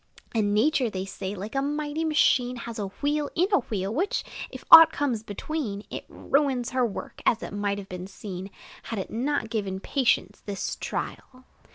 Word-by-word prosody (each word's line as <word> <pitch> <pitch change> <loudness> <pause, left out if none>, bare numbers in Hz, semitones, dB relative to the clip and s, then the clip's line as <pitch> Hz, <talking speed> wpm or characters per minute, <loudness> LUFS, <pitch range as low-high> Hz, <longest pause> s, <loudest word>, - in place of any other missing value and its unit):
And 205 -3 +1
Nature, 255 +2 +3
they 190 -2 -4
say, 195 +1 -5
like 205 +3 -6
a 270 - +1
mighty 295 +2 -2
machine, 265 -5 +3
Has 235 -1 -6
a 200 - -2 0.2
wheel 295 0 +1
in 360 +3 +2
a - - +6
wheel, 205 -5 -3
which, 365 - 0 0.3
if - - -10
aught 325 0 +12
comes 255 -7 -1
between, 215 0 -4
It - - -5
ruins 270 -4 0
her 255 0 +2
work, 225 -5 -4
as 230 - +2
it - - -6
might 205 0 -1
have 200 -1 -7
been 180 0 -6
seen, 190 -1 -7 0.3
Had 225 - -5
it 190 - -4
not 255 0 -1
given 200 -4 -2
patience 260 +4 0
this 200 -2 -3
trial. 255 0 -6
230 Hz, 185 wpm, -26 LUFS, 200-285 Hz, 0.3 s, aught